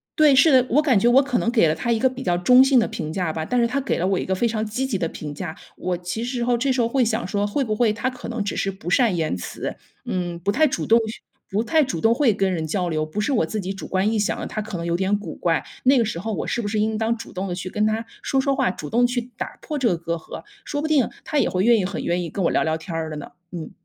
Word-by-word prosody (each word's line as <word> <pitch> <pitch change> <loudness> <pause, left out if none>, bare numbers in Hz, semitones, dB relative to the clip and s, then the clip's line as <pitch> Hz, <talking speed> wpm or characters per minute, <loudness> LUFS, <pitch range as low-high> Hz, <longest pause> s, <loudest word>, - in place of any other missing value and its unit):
对， 300 -3 +5
是 280 +4 +6
的， 255 -1 +5
我 285 - +4
感 260 -9 +3
觉 235 - +3
我 265 +3 +6
可 265 -3 0
能 230 - 0
给 230 -8 +4
了 155 - +2
他 200 +9 -2
一 230 - +3
个 260 - +4
比 260 0 -5
较 175 -5 +1
中 250 +8 +6
性 265 -1 +5
的 230 - +1
评 155 -1 -5
价 175 -2 -2
吧。 160 - -3
但 245 +10 0
是 235 - +4
他 275 +4 -1
给 270 - -1
了 175 - 0
我 190 0 +1
一 - - -3
个 190 - 0
非 235 +6 +1
常 220 -1 -1
积 220 +5 -2
极 265 -5 -2
的 175 -3 0
评 150 -2 -7
价， 160 +2 -6 0.2
我 180 -1 -2
其 180 +6 -4
实 245 -1 -2
侯 245 0 +2
这 260 +3 +1
时 255 - 0
候 230 - +2
会 260 +2 +2
想 225 0 -1
说， 205 0 0
会 270 +7 0
不 215 -4 -1
会 225 0 +3
他 250 +4 -2
可 250 - -9
能 235 -3 -2
只 200 - -3
是 195 - 0
不 180 -2 -7
善 230 -3 +3
言 160 - 0
辞。 90 - -5 0.3
嗯， 175 -2 -3
不 185 +4 0
太 310 +8 +4
主 270 - -2
动 230 +1 +5
去 220 - -7 0.3
不 210 +3 0
太 315 +6 +3
主 175 - -3
动 225 +5 +4
会 250 -1 +3
跟 195 -2 0
人 160 -2 -2
交 180 +2 -1
流。 155 -2 0
不 175 +7 -5
是 275 - 0
我 240 - +3
自 215 +7 -4
己 190 0 -3
主 195 - -8
观 190 +2 +1
臆 220 0 +1
想 - - -1
的， - - -4
他 215 - -4
可 210 -3 -5
能 170 - -4
有 170 0 0
点 190 +3 +1
古 195 -6 -7
怪， 165 -2 0 0.2
那 265 +1 +5
个 235 - +3
时 205 -6 -3
候 220 +5 -4
我 - - -3
是 240 - -1
不 205 - -3
是 210 +1 -1
应 215 +1 +1
当 225 +1 0
主 230 - -10
动 185 +2 -3
地 175 - -3
去 185 0 -5
跟 210 0 +1
他 220 +1 -1 0.2
说 270 - 0
说 275 +1 +1
话， - - +2
主 155 -5 -6
动 245 +2 +4
去 245 0 -3
打 - - -6
破 300 -3 -3
这 255 - +2
个 175 - 0
隔 170 0 -3
阂。 165 - -9 0.2
说 290 - -3
不 310 - -1
定 290 -6 +3 0.2
他 300 - 0
也 - - +2
会 185 0 0
愿 235 +1 +5
意 190 - 0
很 195 - -4
愿 175 +1 0
意 170 - -4
跟 190 +3 -2
我 - - +2
聊 - - +2
聊 160 0 0
天 165 +1 -7
儿 160 -1 -2
的 155 - -6
呢， 150 - -7 0.2
嗯。 170 -3 -6
215 Hz, 350 characters per minute, -23 LUFS, 180-245 Hz, 0.3 s, 是